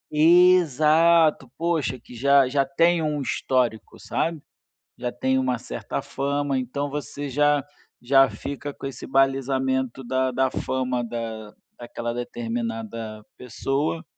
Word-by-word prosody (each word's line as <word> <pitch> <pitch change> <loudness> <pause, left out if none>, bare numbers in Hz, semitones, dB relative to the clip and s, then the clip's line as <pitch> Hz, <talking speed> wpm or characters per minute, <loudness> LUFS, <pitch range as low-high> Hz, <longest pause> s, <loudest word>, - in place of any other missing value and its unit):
Exato! 165 -3 +5
Puxa, 160 -7 -1
que 125 - -15
já 140 +2 +4
já 140 +1 +2
tem 165 +5 +2
um 150 -2 -1
histórico, 125 -4 -1
sabe, 165 -2 -2 0.6
já 120 - -4
tem 130 0 0
uma 130 -2 0
certa - - -5
fama, 140 0 -2
então, 135 +3 -3
você 145 0 -5
já 145 +1 +2 0.4
já 135 +2 +5
fica 140 +1 -6
com 135 - -8
esse 135 - -7
balizamento 130 -1 +1
da 130 +1 0
da 130 +1 +1
fama 130 -1 -2
da 115 -2 -6 0.3
daquela 120 -1 -5
determinada 115 -2 -5
pessoa, 135 +6 -2
135 Hz, 125 wpm, -24 LUFS, 120-145 Hz, 0.6 s, Exato